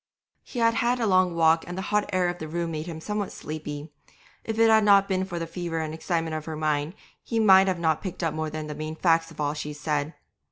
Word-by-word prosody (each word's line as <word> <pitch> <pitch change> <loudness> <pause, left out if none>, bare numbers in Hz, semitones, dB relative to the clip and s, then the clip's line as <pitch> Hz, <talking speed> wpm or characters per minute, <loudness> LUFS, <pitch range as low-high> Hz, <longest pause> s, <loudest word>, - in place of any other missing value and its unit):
He - - -11
had 230 -1 +3
had 240 +2 +1
a 230 - +1
long 185 -3 +3
walk 165 0 +4
and 175 +1 -6
the 190 - -3
hot 210 0 +2
air 185 -1 +2
of 175 0 -3
the 155 - -5
room 170 +1 -3
made 155 +1 -4
him 165 -2 -6
somewhat 210 +3 -3
sleepy; 150 -1 -7 0.5
if 220 -1 -4
it 225 0 +5
had 220 -1 +5
not 200 -1 +5
been 190 -1 0
for 175 -2 -6
the 165 - -2
fever 170 -1 -4
and 155 -1 -3
excitement 165 -1 -2
of 155 -1 -5
her 160 - -5
mind 155 +2 -1 0.3
he 230 - -3
might 195 -3 +7
not 190 -2 0
have 160 -2 +1
picked 185 -2 -5
up 165 - 0
more 155 0 -2
than 155 0 -5
the 150 - -5
main 155 +1 -5
facts 165 -1 +2
of 165 - -15
all 145 -1 0
she 150 0 -5
said. 150 +1 -2
165 Hz, 255 wpm, -26 LUFS, 155-190 Hz, 0.5 s, might